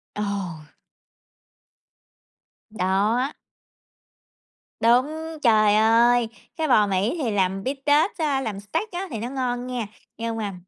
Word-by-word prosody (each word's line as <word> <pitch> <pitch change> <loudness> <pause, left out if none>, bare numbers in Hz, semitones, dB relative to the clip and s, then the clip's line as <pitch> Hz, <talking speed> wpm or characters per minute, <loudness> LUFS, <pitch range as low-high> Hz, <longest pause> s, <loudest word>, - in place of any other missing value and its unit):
Ồ! 195 -7 -4 2.0
Đó! 215 +7 0 1.5
Đúng, 305 +8 +1
trời 215 -4 +4
ơi, 230 +2 +4 0.3
cái 315 -1 0
bò 215 -5 +4
Mỹ 200 - 0
thì 230 - 0
làm 195 -1 0
bít 270 +2 -2
tết 300 +7 +3
á, 290 -4 0
làm 210 -6 -4
steak 205 - -3
á 370 +2 -4
thì 225 - -4
nó 235 +3 -4
ngon 250 -2 -2
nghe, 245 -4 -3 0.3
nhưng 230 0 -3
mà 205 -3 -3
230 Hz, 125 wpm, -24 LUFS, 205-265 Hz, 2.0 s, trời